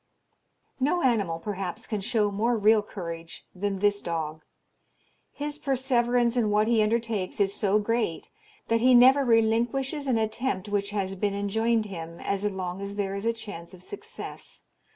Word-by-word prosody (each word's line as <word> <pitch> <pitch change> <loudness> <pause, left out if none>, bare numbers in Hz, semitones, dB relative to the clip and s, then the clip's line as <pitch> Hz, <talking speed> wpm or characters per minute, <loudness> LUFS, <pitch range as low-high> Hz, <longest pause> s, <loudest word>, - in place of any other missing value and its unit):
No 300 +7 +1
animal, 205 -10 +2
perhaps, 195 +3 -5
can 215 -3 -3
show 215 -1 +1
more 230 +4 +1
real 215 +1 +5
courage 170 -5 -8
than 195 +1 -2
this 205 +1 +2
dog. 160 -2 -3 0.9
His 295 +1 -5
perseverance 245 -3 +1
in 230 -4 +2
what 210 +1 +3
he 230 -2 +3
undertakes 215 -3 -1
is 200 -1 +2
so 200 0 +2
great, 215 -5 -1 0.4
that 230 0 +2
he 255 +1 +6
never 260 +3 +7
relinquishes 240 +5 +1
an 250 -3 +2
attempt 220 -2 0
which 205 -1 -1
has 195 -2 -2
been 200 +1 -1
enjoined 220 +3 +1
him 170 -4 -7
as 200 0 -2
long 190 -2 -3
as 200 0 -5
there 200 -1 -2
is 200 +3 -3
a - - +4
chance 190 -6 -9
of 180 - -13
success. 450 +3 -9
210 Hz, 160 wpm, -27 LUFS, 195-235 Hz, 0.9 s, never